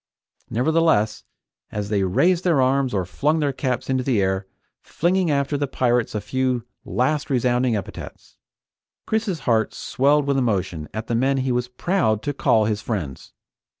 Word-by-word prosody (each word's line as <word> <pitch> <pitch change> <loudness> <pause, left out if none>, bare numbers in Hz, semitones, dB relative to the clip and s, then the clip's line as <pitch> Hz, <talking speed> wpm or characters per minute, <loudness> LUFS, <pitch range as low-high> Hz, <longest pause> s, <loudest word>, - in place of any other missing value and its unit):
Nevertheless, 125 -5 +1 0.5
as 105 -1 -4
they 105 -2 +1
raised 170 - +2
their 170 -6 +3
arms 130 0 +2
or 95 -4 -1
flung 150 - 0
their 145 -3 0
caps 130 -2 -2
into 130 -1 0
the 125 -5 +1
air, 95 0 0 0.3
flinging 180 +1 0
after 140 0 0
the 145 - 0
pirates 120 -4 0
a 105 - -1
few 130 +1 -1 0.2
last 140 +4 0
resounding 125 -2 +1
epithets. 100 - -8 0.7
Chris's 210 -8 -1
heart 115 -4 +1
swelled 145 +2 +2
with 140 -1 +1
emotion 95 -10 -1
at 110 +1 -5
the 120 - -3
men 135 +4 +2
he 130 -1 0
was 125 0 0
proud 125 - 0
to 145 - -2
call 110 -5 +3
his 105 0 -1
friends. 85 - -5
125 Hz, 160 wpm, -22 LUFS, 110-145 Hz, 0.7 s, their